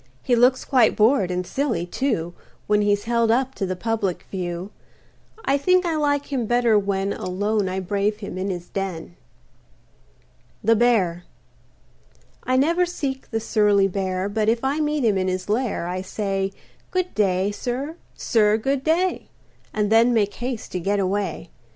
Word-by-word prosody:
He 245 Hz, -, +2 dB
looks 250 Hz, +2 st, +3 dB
quite 250 Hz, -5 st, +4 dB
bored, 215 Hz, -3 st, +3 dB
and 180 Hz, 0 st, -2 dB
silly, 235 Hz, -8 st, -1 dB
too, 175 Hz, -5 st, -2 dB, 0.3 s
When 210 Hz, 0 st, +2 dB
he's 205 Hz, 0 st, +1 dB
held 235 Hz, 0 st, +1 dB
up 260 Hz, +3 st, +2 dB
to 185 Hz, -5 st, -3 dB
public 205 Hz, -2 st, -2 dB
view. 180 Hz, 0 st, -4 dB, 0.7 s
I 275 Hz, +1 st, +2 dB
think 365 Hz, +5 st, +3 dB
I 335 Hz, -2 st, 0 dB
like 285 Hz, -1 st, 0 dB
him 245 Hz, -5 st, -1 dB
better 240 Hz, -1 st, +3 dB
when 195 Hz, 0 st, -1 dB
Alone 205 Hz, +2 st, -1 dB
I 190 Hz, +1 st, -2 dB
brave 200 Hz, +2 st, -1 dB
him 200 Hz, -4 st, -7 dB
in 185 Hz, +2 st, -2 dB
his 175 Hz, -2 st, -5 dB
den. 180 Hz, -4 st, -5 dB, 1.5 s
THE 225 Hz, +2 st, +4 dB
BEAR 200 Hz, -7 st, +2 dB, 1.2 s
I 255 Hz, -, 0 dB
never 335 Hz, +6 st, +3 dB
seek 270 Hz, -6 st, -4 dB
the 225 Hz, -, -1 dB
surly 210 Hz, -3 st, +3 dB
Bear, 190 Hz, 0 st, -2 dB
But 215 Hz, +1 st, 0 dB
if 230 Hz, +2 st, 0 dB
I 275 Hz, +3 st, 0 dB
meet 300 Hz, -3 st, 0 dB
him 205 Hz, -4 st, +2 dB
in 185 Hz, -, 0 dB
his 185 Hz, +1 st, -3 dB
lair 220 Hz, -4 st, 0 dB
I 180 Hz, +1 st, -3 dB
say, 195 Hz, 0 st, -2 dB, 0.4 s
"Good 365 Hz, -1 st, -1 dB
day, 195 Hz, -1 st, +1 dB
sir; 260 Hz, +8 st, -4 dB, 0.2 s
sir, 215 Hz, -2 st, +2 dB
good 270 Hz, +4 st, -1 dB
day," 345 Hz, +4 st, +1 dB, 0.4 s
And 210 Hz, -1 st, -1 dB
then 230 Hz, +2 st, +5 dB
make 205 Hz, -2 st, +1 dB
haste 245 Hz, -2 st, -5 dB
to 180 Hz, -, -2 dB
get 200 Hz, +4 st, 0 dB
away. 190 Hz, -, -2 dB
210 Hz, 165 wpm, -23 LUFS, 190-255 Hz, 1.5 s, then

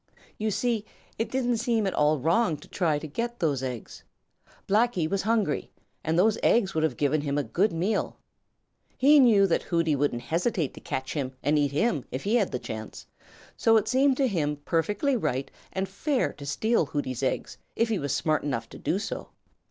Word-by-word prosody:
You 215 Hz, 0 st, 0 dB
see, 220 Hz, +1 st, 0 dB, 0.4 s
it 225 Hz, -, -1 dB
didn't 245 Hz, -2 st, 0 dB
seem 225 Hz, -1 st, +1 dB
at 190 Hz, -, -1 dB
all 150 Hz, +1 st, +3 dB
wrong 165 Hz, -, +2 dB
to -, -, -15 dB
try 160 Hz, -6 st, 0 dB
to 150 Hz, -, -6 dB
get 235 Hz, +10 st, -3 dB
those 145 Hz, -6 st, 0 dB
eggs. 125 Hz, -4 st, -6 dB, 0.6 s
Blacky 215 Hz, -5 st, +2 dB
was 195 Hz, +3 st, -1 dB
hungry, 215 Hz, -9 st, 0 dB, 0.3 s
and 160 Hz, +1 st, 0 dB
those 215 Hz, +4 st, +3 dB
eggs 195 Hz, -5 st, +3 dB
would 160 Hz, -, 0 dB
have 150 Hz, -6 st, 0 dB
given 145 Hz, +1 st, +1 dB
him 145 Hz, -1 st, -2 dB
a 145 Hz, -, +1 dB
good 180 Hz, -, +1 dB
meal. 185 Hz, +6 st, -1 dB, 0.8 s
He 290 Hz, +3 st, +6 dB
knew 220 Hz, -7 st, +6 dB
that 180 Hz, -, +1 dB
Hooty 165 Hz, -3 st, +1 dB
wouldn't 135 Hz, -4 st, -1 dB
hesitate 170 Hz, -, -1 dB
to -, -, -11 dB
catch 130 Hz, 0 st, -4 dB
him 135 Hz, -4 st, -3 dB
and 150 Hz, +2 st, +3 dB
eat 145 Hz, -2 st, +1 dB
him 150 Hz, -, +1 dB
if 130 Hz, -, -5 dB
he 205 Hz, -, 0 dB
had 205 Hz, -5 st, +1 dB
the 125 Hz, -, -1 dB
chance, 110 Hz, -3 st, -7 dB
and -, -, -40 dB, 0.4 s
so 225 Hz, 0 st, +4 dB
it 220 Hz, 0 st, 0 dB
seemed 265 Hz, +2 st, +3 dB
to 275 Hz, -, +3 dB
him 155 Hz, -9 st, 0 dB
perfectly 205 Hz, -, +1 dB
right 145 Hz, -, -2 dB, 0.2 s
and 190 Hz, 0 st, -2 dB
fair 255 Hz, -, -1 dB
to 140 Hz, -, -10 dB
steal 220 Hz, +2 st, +1 dB
Hooty's 135 Hz, -4 st, -3 dB
eggs 130 Hz, -, -2 dB, 0.2 s
if 230 Hz, 0 st, +1 dB
he 215 Hz, -4 st, 0 dB
was 140 Hz, -1 st, -2 dB
smart 155 Hz, +1 st, +1 dB
enough 115 Hz, -6 st, -3 dB
to -, -, -11 dB
do 185 Hz, -, 0 dB
so. 205 Hz, -, -5 dB
170 Hz, 200 wpm, -27 LUFS, 145-225 Hz, 0.8 s, He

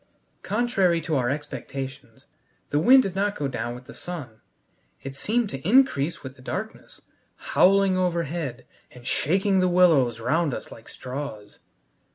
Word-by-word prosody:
Contrary 200 Hz, -5 st, +1 dB
to 160 Hz, -1 st, -2 dB
our 125 Hz, -3 st, +1 dB
expectations, 135 Hz, -3 st, -6 dB, 0.5 s
the 145 Hz, -, +2 dB
wind 260 Hz, +10 st, +7 dB
did 195 Hz, -, -3 dB
not 200 Hz, +1 st, 0 dB
go 145 Hz, -, -2 dB
down 120 Hz, -2 st, -4 dB
with 125 Hz, +1 st, -12 dB
the -, -, -11 dB
sun. 140 Hz, -11 st, -8 dB, 0.6 s
It 135 Hz, 0 st, -7 dB
seemed 220 Hz, -, 0 dB
to 135 Hz, -, -5 dB
increase 175 Hz, -, +2 dB
with 130 Hz, -1 st, -8 dB
the 130 Hz, -, -17 dB
darkness, 205 Hz, +11 st, -7 dB, 0.3 s
howling 195 Hz, 0 st, +3 dB
overhead 165 Hz, -7 st, -2 dB, 0.2 s
and 125 Hz, -1 st, -15 dB
shaking 190 Hz, +9 st, +1 dB
the 185 Hz, -, +3 dB
willows 155 Hz, -10 st, +4 dB
round 145 Hz, +4 st, 0 dB
us -, -, -9 dB
like 110 Hz, -, -13 dB
straws. 125 Hz, -5 st, -7 dB
150 Hz, 150 wpm, -25 LUFS, 130-185 Hz, 0.6 s, wind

